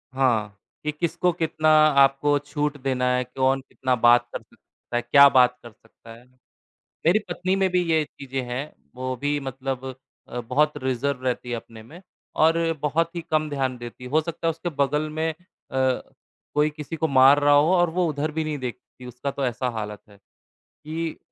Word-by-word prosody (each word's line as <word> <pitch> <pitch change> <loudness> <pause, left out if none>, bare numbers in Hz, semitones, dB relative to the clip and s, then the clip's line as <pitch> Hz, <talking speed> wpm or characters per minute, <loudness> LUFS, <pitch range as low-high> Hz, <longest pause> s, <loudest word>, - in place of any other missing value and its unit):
हाँ, 110 -6 +1 0.3
कि 150 - -1
किसको 170 +3 0
कितना 155 -2 0 0.3
आपको 135 +2 +3
छूट 145 0 -3
देना 130 -2 -1
है, 125 - 0
कौन 130 +2 0
कितना 130 -1 -2
बात 120 +1 +5
कर - - -4
सकता 120 - -14
है, 120 - +2
क्या 140 +4 +7
बात 125 -2 +4
कर 120 - -11
सकता 115 +1 -17
है। 120 +2 -16 0.8
मेरी 175 +6 +5
पत्नी 185 +2 -1
में 195 -1 +2
भी 180 0 +2
ये 160 -1 +3
चीज़ें 135 -2 -6
हैं, 135 +5 -4 0.2
वो 130 0 -3
भी 145 +3 -1
मतलब 135 -1 -5 0.4
अ, 125 - -4
बहुत 145 +6 +1
रिज़र्व 130 +1 -1
रहती 125 -1 -2
है 120 - -1
अपने 115 -1 -10
में 165 +10 -14 0.4
और 160 +1 +4 0.2
बहुत 165 +3 0
ही 170 - -3
कम 155 -1 +1
ध्यान 135 -3 -2
देती 120 +1 -10
है, 125 - -7
हो 155 +3 +3
सकता 165 +1 -4
है - - +4
उसके 165 +2 -5
बगल 150 0 0
में 160 +1 -1
अ, - - -14 0.4
कोई 130 +3 -2
किसी 150 +1 -7
को 160 - 0
मार 135 0 +6
रहा 145 0 +5
हो 150 +5 +4
और 175 -1 +3
वो 175 +1 0
उधर 150 +1 -2
भी 160 +1 -2
नहीं 155 -1 -3
देखती, 125 0 -8
उसका 125 +3 -5
तो 135 -1 -2
ऐसा 125 +1 -2
हालत 105 -3 -6
है, 100 - -18 0.5
कि 160 +1 -6
140 Hz, 190 wpm, -24 LUFS, 125-155 Hz, 0.8 s, क्या